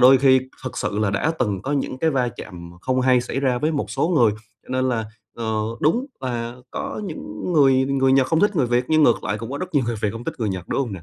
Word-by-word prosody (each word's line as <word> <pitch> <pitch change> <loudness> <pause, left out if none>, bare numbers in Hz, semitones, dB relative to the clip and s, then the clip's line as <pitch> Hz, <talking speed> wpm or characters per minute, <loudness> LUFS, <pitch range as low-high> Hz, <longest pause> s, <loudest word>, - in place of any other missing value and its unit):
đôi 130 +1 +8
khi 130 -1 +5 0.2
thực 130 - -5
sự 105 - -2
là 105 -2 +1
đã 150 +10 0
từng 100 -6 -1
có 140 - -2
những 135 -2 -2
cái 160 +2 +2
va 130 -3 +1
chạm 85 -2 -9
không 130 +2 0
hay 125 -1 +4
xảy 130 +2 -3
ra 130 -3 +1
với 155 +4 0
một 145 - -2
số 140 +4 0
người 125 -12 +4 0.3
cho - - -24
nên 130 0 0
là, 115 -3 0 0.3
ờ, 110 -2 -1 0.2
đúng 235 - +2
là 120 -2 -3
có - - -4
những 155 - -5
người 135 -4 +5
người 135 -1 +2
Nhật 135 -1 +4
không 160 -1 +1
thích 205 -2 +2
người 135 - +3
Việt 120 +1 +1
nhưng 155 0 +4
ngược 120 - +3
lại 100 +3 -1
cũng 115 +2 -6
có 140 - -4
rất 185 -2 -6
nhiều 135 - +3
người 120 - -1
Việt 105 - +1
hông 115 +1 -7
thích - - -3
người 110 -3 -1
Nhật, 90 -2 -5
đúng - - 0
hông 120 -7 -2
nè? 90 - -7
130 Hz, 280 wpm, -22 LUFS, 115-140 Hz, 0.3 s, đôi